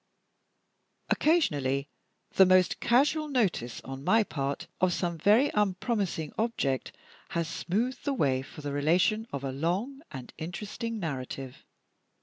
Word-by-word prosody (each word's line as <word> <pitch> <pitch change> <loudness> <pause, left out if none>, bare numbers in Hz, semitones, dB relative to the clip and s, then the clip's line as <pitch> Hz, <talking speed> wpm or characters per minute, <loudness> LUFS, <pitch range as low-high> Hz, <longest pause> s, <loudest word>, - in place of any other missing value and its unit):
Occasionally 145 - +2 0.4
the 190 - +6
most 185 -1 +4
casual 290 +6 +3
notice, 200 - 0
on 135 0 -8
my 225 +8 +4
part, 140 -7 -3
of 185 -1 +3
some 170 -1 -1
very 215 - +4
unpromising 195 - -1
object 180 - -1 0.4
has 170 -1 -1
smoothed 225 +10 -2
the 285 - 0
way 135 - +2
for 135 +3 -11
the 145 -1 -4
relation 180 +10 +2
of 140 -1 -4
a 135 - -2
long 185 - -2
and 130 -3 -9
interesting 210 +7 -5
narrative. 135 -5 -5
180 Hz, 130 wpm, -29 LUFS, 140-225 Hz, 0.4 s, the